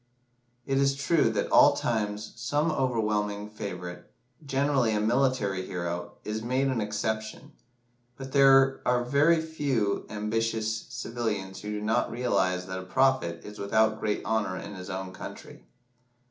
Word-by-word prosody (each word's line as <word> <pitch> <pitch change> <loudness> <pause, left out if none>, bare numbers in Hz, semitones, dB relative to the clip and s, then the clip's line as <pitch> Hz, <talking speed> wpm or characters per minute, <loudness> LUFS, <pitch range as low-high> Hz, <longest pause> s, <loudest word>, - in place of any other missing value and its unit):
It 135 -1 +1
is 135 0 +3
true 140 -2 +2
that 110 - -2
at - - +7
times 105 -2 -2
some 150 +3 0
overwhelming 105 -6 -1
favourite, 90 -4 -6 0.4
generally 135 -4 +1
a - - +1
military 110 -4 +1
hero, 85 -1 -4
is 110 +1 -3
made 130 +4 0
an 125 -4 0
exception; 110 +6 -3 0.7
but 135 0 -8
there 135 -1 +5
are 125 0 +1
few 125 - -8
very 145 -8 +1
ambitious 110 0 -1
civilians 105 -5 -4
who 105 - -6
do 105 0 -3
not 110 +2 +1
realise 90 -7 0
that 95 0 -5
a - - -7
prophet 95 -5 +1
is 105 0 -9
without 110 +2 +2
great 105 -1 -2
honour 105 -4 0
in - - -7
his 90 0 -8
own 95 -1 -5
country. - - -10
110 Hz, 145 wpm, -28 LUFS, 105-135 Hz, 0.7 s, at